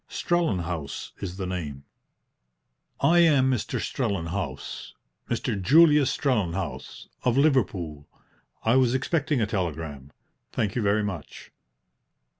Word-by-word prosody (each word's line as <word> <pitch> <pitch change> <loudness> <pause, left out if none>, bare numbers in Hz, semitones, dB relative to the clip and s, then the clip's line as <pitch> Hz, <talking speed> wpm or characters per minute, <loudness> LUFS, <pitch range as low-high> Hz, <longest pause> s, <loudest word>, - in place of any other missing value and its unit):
"Strellenhaus 90 - -2
is 95 -2 -5
the 95 - -3
name." 75 -7 -5 1.2
"I 165 +5 +5
am 145 -6 +5
Mr. 120 -5 -1
Strellenhaus 100 - -3 0.4
Mr. 100 - -1
Julius 150 - +6
Strellenhaus, 95 - -2 0.2
of 125 0 +2
Liverpool. 95 - +1 0.6
I 115 +3 +4
was 130 -1 +3
expecting 145 0 0
a - - +3
telegram. 80 - -4 0.4
Thank 105 -3 -1
you 125 - 0
very 105 +1 +2
much." 95 -7 -6
105 Hz, 105 wpm, -26 LUFS, 85-130 Hz, 1.2 s, Julius